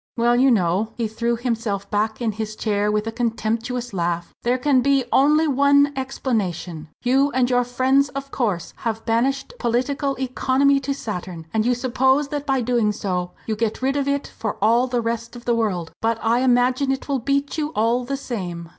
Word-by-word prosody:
Well, 240 +1 +3
you 260 +2 +4
know," 200 0 +1
he 230 -2 -1
threw 235 +2 -1
himself 230 -4 -2
back 215 +3 -1
in 225 - +1
his 215 0 -5
chair 210 -1 0
with 210 0 0
a 225 - -3
contemptuous 235 +1 -2
laugh, 170 -1 -2
"there 245 +2 +1
can 260 0 +3
be 275 0 +3
only 300 +4 +4
one 285 +1 +4
explanation. 190 - -3
You 265 +3 +3
and 255 -1 +2
your 245 0 +3
friends, 260 +3 +2
of 275 0 -7
course, 205 -9 -2
have 225 -1 -3
banished 265 - 0
political 275 +4 0
economy 265 +2 +2
to 275 +1 -3
Saturn 180 -8 -6
and 220 +1 +1
you 250 - +3
suppose 265 +3 +1
that 290 0 -4
by 270 -2 +2
doing 235 -3 +1
so 180 -4 -3
you 220 - -1
get 225 +3 -2
rid 270 +1 +1
of 280 -1 0
it 280 0 0
for 220 -2 -5
all 235 +5 +3
the 245 -1 0
rest 230 +1 -3
of 240 - -11
the 240 - +2
world. 195 -8 -1
But 225 0 +1
I 230 +2 +3
imagine 255 +2 +2
it 270 - -3
will 275 -2 0
beat 280 +4 -1
you, 300 -1 -1
all 230 +3 +2
the 275 +3 -3
same!" 180 -10 -5
240 Hz, 195 wpm, -22 LUFS, 220-270 Hz, -, you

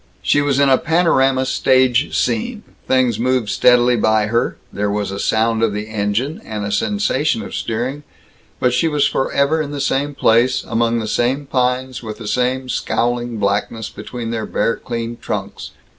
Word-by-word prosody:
She 145 - +3
was 140 -1 +1
in 140 - +4
a 135 -1 +4
panorama 145 -6 +2
stage 130 0 +2
scene; 230 -1 -1 0.2
things 125 -4 +2
moved 125 -2 0
steadily 125 0 +4
by 110 -1 +2
her, 115 +2 0 0.2
there 105 0 -1
was 100 -1 -2
a 100 - -5
sound 115 +1 +1
of 115 -2 +2
the 105 +1 -5
engine, 110 +8 -2
and 105 -2 -5
a 100 - -3
sensation 150 - 0
of - - -9
steering, 125 +6 -3 0.6
but 125 -1 +2
she 130 +6 +2
was 150 -2 +2
forever 140 +4 +1
in 145 - -4
the 145 -1 -5
same 140 +1 -1
place, 120 +2 +3
among 115 0 0
the 110 -2 -3
same 130 +6 0
pines, 130 -1 -1
with 110 -2 -7
the 115 - -9
same 130 +3 0
scowling 120 -1 -1
blackness 105 +2 -1
between 120 -2 -6
their 110 -2 -3
bare 115 - 0
clean 115 -1 -5
trunks. - - -5
125 Hz, 175 wpm, -18 LUFS, 110-135 Hz, 0.6 s, in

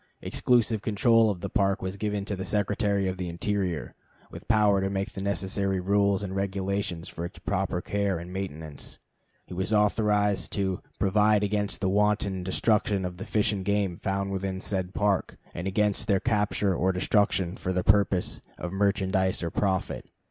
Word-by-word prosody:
Exclusive 115 -3 +2
control 110 +2 +4
of 95 -4 -3
the - - -3
Park 100 -3 +1
was 95 +1 -3
given 105 -1 -2
to 100 - -3
the 95 - -5
Secretary 100 +1 0
of 95 0 -2
the 90 -2 -3
Interior, 90 -1 -2 0.4
with - - -10
power 105 -3 +4
to 95 - 0
make 100 +2 -2
the 95 - -5
necessary 95 0 -1
rules 100 +1 +2
and 95 -1 -4
regulations 95 -2 -2
for 85 - -6
its 85 +1 -6
proper 90 0 -1
care 100 -2 -1
and 85 +2 -8
maintenance. 80 -6 -6 0.5
He - - -10
was 95 +4 -2
authorized 105 -1 +2
to 95 -2 -1 0.2
"provide 105 +2 +3
against 105 -1 -1
the 95 - +1
wanton 100 -1 +1
destruction 100 +1 +1
of 90 -1 -5
the - - -7
fish 105 0 +2
and 95 -2 -3
game 100 -2 0
found 100 +1 -2
within 95 -1 -2
said 95 -1 -3
Park, 100 -3 0 0.2
and 85 +2 -4
against 105 +1 +1
their 100 -1 +3
capture 105 -3 +1
or 90 +2 +1
destruction 95 -1 +1
for 95 - -3
the 90 -1 0
purpose 100 -2 +2 0.2
of 90 - -5
merchandise 95 -2 +1
or 85 - -2
profit." 95 -2 -1
100 Hz, 175 wpm, -27 LUFS, 95-105 Hz, 0.5 s, control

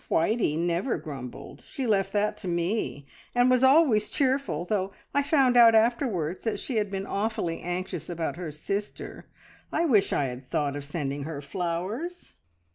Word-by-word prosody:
Whitey 165 -3 +2
never 175 +8 0
grumbled. 135 -5 -8
She 265 - -5
left 195 -4 +1
that 210 0 +1
to - - -7
me, 170 -3 -1 0.3
and 245 +1 +4
was 255 0 +3
always 265 -6 +5
cheerful, 265 - 0
though 195 0 -1 0.2
I 285 - +3
found 275 -4 +3
out 230 -2 +8
afterwards 220 - +1
that 225 - -2
she 250 - -3
had 210 -2 +1
been 195 0 -3
awfully 200 -5 -2
anxious 175 -2 -4
about 170 -2 -2
her 175 -2 -5
sister. 195 +7 -5 0.4
I 330 - +1
wish 210 -10 +3
I - - +1
had 125 -1 -5
thought 145 -2 0
of 145 -1 -5
sending 140 -2 -3
her 155 -2 -5
flowers!" 185 - -4
195 Hz, 165 wpm, -27 LUFS, 165-235 Hz, 0.4 s, out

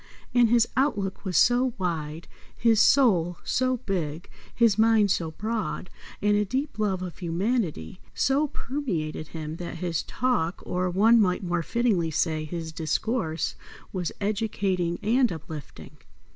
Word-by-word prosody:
And 240 -2 +5
his 235 0 +4
outlook 205 -9 0
was 185 -6 -1
so 245 - +4
wide, 165 -3 -3 0.3
his 225 -2 +4
soul 180 -12 +4
so 255 0 +1
big, 175 - -4 0.2
his 230 -4 +4
mind 220 -3 +4
so 165 -3 0
broad, 215 +2 -4 0.3
and 205 0 +4
a 210 - +3
deep 260 +4 -3
love 190 -4 0
of 180 -2 -7
humanity 180 - -2
so 280 +3 +2
permeated 185 - -4
him 155 0 -6
that 170 -1 -6
his 170 -1 -2
talk, 225 -9 -1
or 180 0 -1
one 220 +6 +5
might 180 -1 +1
more 175 -1 0
fittingly 210 -4 +1
say, 155 0 0
his 165 0 -5
discourse, 165 +2 -1 0.4
was 180 -3 -2
educating 200 -4 -1
and 240 +3 +3
uplifting. 160 -3 -9
190 Hz, 140 wpm, -26 LUFS, 165-230 Hz, 0.4 s, And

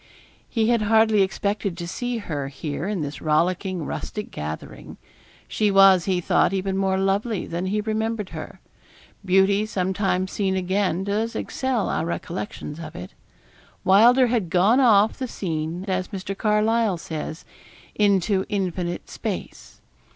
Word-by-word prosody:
He 225 -1 +1
had 235 -2 +3
hardly 220 0 +4
expected 200 -1 -1
to 170 -1 -5
see 245 +6 -3
her 150 -10 -4
here 145 +4 -5
in 205 -5 -2
this 140 -2 -5
rollicking, 175 +2 0
rustic 210 -1 -5
gathering. 75 +1 -7 0.5
She 210 -1 +1
was, 195 -3 +6
he 185 -2 +1
thought, 180 - +2
even 190 0 -1
more 190 -1 +1
lovely 195 +2 0
than 175 +2 -3
he 210 +2 0
remembered 220 -1 -2
her. - - -8 0.6
Beauty 195 +2 +3
sometimes 190 -1 -1
seen 195 -2 0
again 185 -1 0
does 215 +3 -1
excel 255 -4 -1
our - - -1
recollections 170 -2 -5
of 155 -2 -8
it. 90 +2 -8 0.7
Wylder 235 +7 +6
had 230 -7 0
gone 195 +9 +4
off 220 -4 +4
the 260 - -2
scene, 165 -3 -4
as 185 -1 -1
Mr. 195 -1 -5
Carlyle 215 -1 +2
says, 160 0 -6 0.5
into 200 -1 +2
infinite 180 -3 -2
space. - - -6
195 Hz, 140 wpm, -23 LUFS, 180-215 Hz, 0.7 s, was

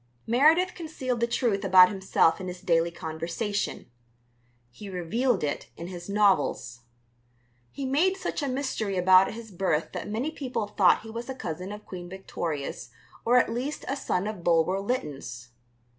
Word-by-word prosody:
Meredith 315 +10 +4
concealed 265 -7 -4
the 235 - +2
truth 235 -4 0
about 185 -1 +7
himself 190 -3 +2
in 185 - -5
his 180 0 -7
daily 170 -2 +2
conversation; 170 +6 -3 0.9
he 200 - -10
revealed 195 +5 0
it 145 - -3
in 170 +1 -7
his 175 0 -8
novels. 190 - +2 0.9
He 275 - -5
made 330 +9 +2
such 370 - -3
a 285 - -1
mystery 255 -7 -2
about 185 +1 +6
his 225 -1 -9
birth 175 -4 0
that - - -5
many 240 +9 -2
people 255 -8 -3
thought 205 -3 +3
he 225 - -10
was 235 +3 -6
a 265 - -4
cousin 180 -3 -5
of 210 0 -9
Queen 175 -2 -8
Victoria's 160 -9 -5 0.4
or 240 +2 +5
at 230 -2 +3
least 260 +5 -4
a 275 - -1
son 195 -8 -1
of 210 -5 -5
Bulwer 170 +3 +3
Lytton's. 145 - -4
200 Hz, 160 wpm, -27 LUFS, 175-245 Hz, 0.9 s, about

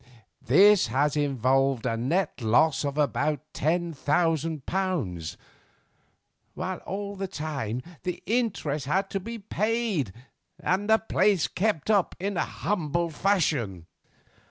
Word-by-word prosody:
This 190 - +6
has 140 +5 +1
involved 135 -2 +1
a 115 -2 0
net 140 +7 -1
loss 135 +8 +3
of 140 0 -3
about 150 0 +1
ten 170 +3 0
thousand 155 0 0
pounds, 145 - -2 1.2
while - - -3
all 200 +1 -4
the 195 0 -3
time 140 - -4 0.2
the 180 -1 -4
interest 190 - -1
had 195 +6 0
to 195 - -1
be 230 +4 -6
paid 215 - -1 0.5
and 200 +3 0
the 220 - +7
place 205 -5 +2
kept 205 -2 0
up 200 -4 +2
in 200 +2 -2
a 175 - +1
humble 170 -3 -1
fashion." 150 - 0
160 Hz, 125 wpm, -27 LUFS, 135-195 Hz, 1.2 s, the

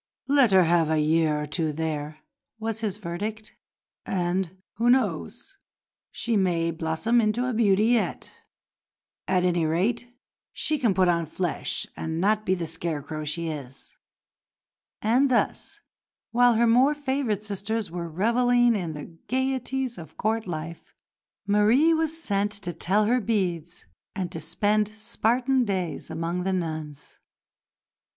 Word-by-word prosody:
"Let 275 -5 +4
her 190 -1 +6
have 165 -1 +3
a 160 - +2
year 155 0 +2
or 150 - -3
two 155 +1 -1
there," 155 0 -4 0.4
was 225 0 -3
his 210 -3 -2
verdict, 210 +4 -5 0.5
"and, 185 0 -1 0.2
who 235 +2 +2
knows, 245 - 0 0.5
she 230 -1 -2
may 170 -4 +1
blossom 165 +9 +1
into 220 +3 +1
a 255 - -1
beauty 210 -2 +3
yet. 235 -1 0 1.0
At 180 -1 +2
any 175 -2 +2
rate 200 +10 0 0.4
she 305 -1 -1
can 230 -8 +2
put 185 0 +4
on 170 -2 +1
flesh 175 +2 -2
and 160 0 -3
not 215 +3 +1
be 185 - +3
the 175 -2 -3
scarecrow 155 -2 -4
she 165 +2 -2
is." 135 -4 -8 1.1
And 250 +6 +3
thus, 245 - 0 0.5
while 245 0 +5
her 235 +2 +4
more 255 +6 +4
favoured 265 -7 -1
sisters 210 0 -3
were 170 -1 -4
revelling 240 +6 +3
in 175 -7 -2
the 150 -1 -7 0.2
gaieties 260 -2 -1
of 160 - -12
Court 220 0 -1
life, 165 0 -7 0.5
Marie 215 +11 +4
was 320 0 0
sent 205 -7 0
to 195 -4 -6
tell 195 +6 +1
her 245 +3 +2
beads 180 -6 -2 0.3
and 185 -3 -3
to - - -5
spend 210 0 +1
Spartan 240 +4 +1
days 185 -7 -3
among 165 +2 -2
the 190 +1 -1
nuns. 155 -5 -5
195 Hz, 140 wpm, -26 LUFS, 165-235 Hz, 1.1 s, her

